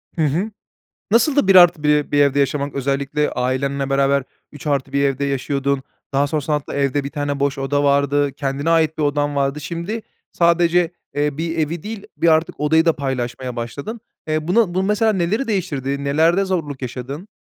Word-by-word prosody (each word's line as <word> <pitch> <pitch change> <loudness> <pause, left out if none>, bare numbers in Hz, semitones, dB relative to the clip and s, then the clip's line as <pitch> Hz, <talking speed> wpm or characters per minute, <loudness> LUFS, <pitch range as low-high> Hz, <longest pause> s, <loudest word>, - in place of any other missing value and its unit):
Hı 165 - -1
hı. 175 +10 -1 0.6
Nasıldı 255 0 +3
1+1 165 -6 +5
bir 145 - +4
evde 140 0 +3
yaşamak? 140 0 0
Özellikle, 140 +2 -1
ailenle 135 +2 -1
beraber 140 0 +2 0.3
3+1 140 -1 -1
evde 140 0 0
yaşıyordun 140 0 -1 0.3
daha 140 +1 +2
sonrasında 150 0 -1
hatta, 145 - -5
evde 140 0 0
1 140 - -4
tane 145 -1 -3
boş 140 0 0
oda 145 +1 0
vardı. 140 0 +2
Kendine 140 +2 -2
ait 160 -1 +2
bir 155 - -1
odan 145 0 0
vardı. 140 +1 0
Şimdi 170 +9 -4 0.3
sadece, 170 0 +3 0.2
eee, 145 0 0
bir 165 0 -3
evi 160 +1 -2
değil 210 -1 -6
bir 170 - +1
artık 160 0 +2
odayı 160 +2 +3
da 165 - +4
paylaşmaya 130 -2 -3
başladın. 140 - -5 0.3
Eee, 155 0 -1
bunu 190 -1 +2
bu, 185 - +1
mesela, 210 +2 +2
neleri 200 +8 0
değiştirdi? 140 - -2
Nelerde 165 +7 +2
zorluk 155 -8 -3
yaşadın? 130 - -6
145 Hz, 165 wpm, -20 LUFS, 140-170 Hz, 0.6 s, 1+1